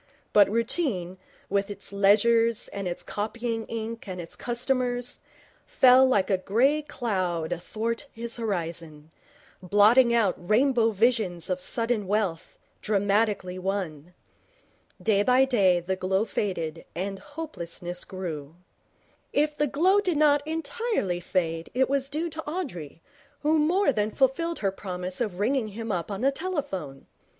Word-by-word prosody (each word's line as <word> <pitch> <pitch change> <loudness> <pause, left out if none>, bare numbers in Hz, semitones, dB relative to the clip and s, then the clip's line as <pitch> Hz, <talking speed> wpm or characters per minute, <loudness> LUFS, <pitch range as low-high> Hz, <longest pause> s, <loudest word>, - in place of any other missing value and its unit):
But 205 -2 +6
routine, 220 - 0 0.3
with 200 +1 0
its 200 0 -2
ledgers 220 +3 +4
and 200 -2 -5
its 175 - -4
copying 225 +2 -3
ink 230 0 -5
and 185 -1 -5
its 165 -1 -7
customers, 245 0 -1 0.5
fell 260 +1 +6
like 205 -6 +2
a 190 - +2
grey 260 +11 +2
cloud 185 - -2
athwart 225 +9 -3
his 235 +1 -4
horizon, 165 -7 -4 0.5
blotting 210 +7 +5
out 225 -5 +3
rainbow 230 +5 +3
visions 210 -6 +1
of 185 0 -1
sudden 230 -1 0
wealth, 200 -5 -2 0.2
dramatically 200 -2 0
won. 180 -4 -4 0.8
Day 210 -3 +2
by 255 +4 +4
day 195 -9 +3
the 180 +2 -2
glow 190 +3 0
faded 165 -7 -3
and 195 +2 -3
hopelessness 180 - -6
grew. 160 -5 -6 0.8
If 300 +1 +1
the 295 0 +1
glow 365 +9 +3
did 365 -6 0
not 290 -1 +4
entirely 320 - -2
fade 165 -2 -2
it 260 +1 +3
was 275 0 -1
due 310 +4 -2
to 320 +1 -5
Audrey, 180 - -6 0.4
who 310 +1 +3
more 335 +1 +3
than 210 -1 0
fulfilled 275 +8 0
her 195 - +3
promise 185 0 -5
of 210 -7 -2
ringing 230 +3 +1
him 225 +2 -5
up 175 -1 -2
on 200 0 -4
the 270 +2 +3
telephone. 275 - -4
210 Hz, 140 wpm, -26 LUFS, 185-255 Hz, 0.8 s, But